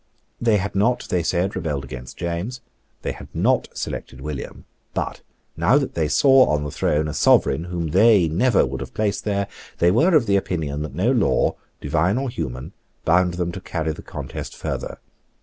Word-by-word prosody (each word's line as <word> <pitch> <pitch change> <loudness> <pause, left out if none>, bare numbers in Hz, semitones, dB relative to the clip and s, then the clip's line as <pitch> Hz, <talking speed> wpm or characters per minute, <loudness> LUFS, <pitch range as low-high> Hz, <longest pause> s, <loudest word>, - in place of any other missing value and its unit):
They 115 -3 +4
had 100 +1 -3
not, 115 +6 +1
they 90 - +1
said, 90 +4 0
rebelled 75 -7 -2
against 65 -1 -9
James. 90 +9 -3 0.4
They - - -1
had - - -9
not - - +2
selected 65 - -5
William. 75 0 -6 0.3
But, - - -3 0.3
now - - +4
that - - -1
they 80 -2 0
saw 130 - +5
on 75 -1 +1
the 75 - -4
throne 75 +3 0
a 75 - -4
Sovereign 75 +5 +3
whom 85 -2 -3
they 100 +1 +5
never 100 +8 +3
would - - -5
have - - -8
placed 105 -2 -1
there, 100 -1 0 0.3
they 85 +1 +4
were 160 - +4
of 130 -7 +4
opinion 80 -7 0
that 75 -3 -5
no 100 +9 +2
law, 120 -7 +2 0.3
divine 85 - +1
or 135 -1 -2
human, 65 - -5 0.3
bound 90 +1 +3
them 90 -1 -1
to 95 - -7
carry 80 -3 -2
the 80 - -8
contest - - -7
further. - - -4
90 Hz, 185 wpm, -22 LUFS, 75-105 Hz, 0.4 s, saw